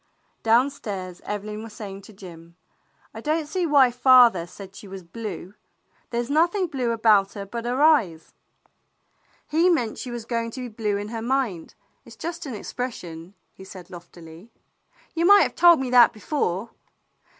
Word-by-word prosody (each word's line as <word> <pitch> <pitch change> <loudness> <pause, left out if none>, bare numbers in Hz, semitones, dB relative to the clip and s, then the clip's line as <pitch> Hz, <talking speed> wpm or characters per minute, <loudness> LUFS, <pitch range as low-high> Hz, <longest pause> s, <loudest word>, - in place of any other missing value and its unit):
Downstairs 220 -7 -1
Evelyn 210 +1 -5
was 225 -1 -10
saying 200 -3 -8
to 210 - -15
Jim: 170 -3 -13 0.6
"I - - -8
don't 310 +1 -1
see 350 +3 -2
why 275 -4 +5
father 245 -8 +5
said 195 +1 -12
she 205 - -11
was 190 -1 -9
blue. 190 0 -8 0.6
There's 235 0 -2
nothing 345 +7 +2
blue 260 -7 -3
about 215 -4 +3
her 200 -2 -7
but 235 +4 -6
her 245 +2 -1
eyes." 205 - +2 1.1
"He 330 +4 +2
meant 245 -11 0
she 255 - -6
was 240 -2 -6
going 230 -1 -2
to - - -5
be 250 - -6
blue 210 -2 -2
in 205 +1 -6
her 225 0 -5
mind. 235 -8 -2 0.3
It - - -14
's - - -15
just 335 -1 -6
an 255 - -5
expression," 185 -7 -7 0.2
he - - -13
said 185 -2 -12
loftily. 170 +3 -13 0.6
"You 335 +1 +1
might 405 0 +8
have - - -2
told 345 -3 +6
me 260 -2 -3
that 245 -2 +6
before." 215 - -3
230 Hz, 170 wpm, -24 LUFS, 195-265 Hz, 1.1 s, might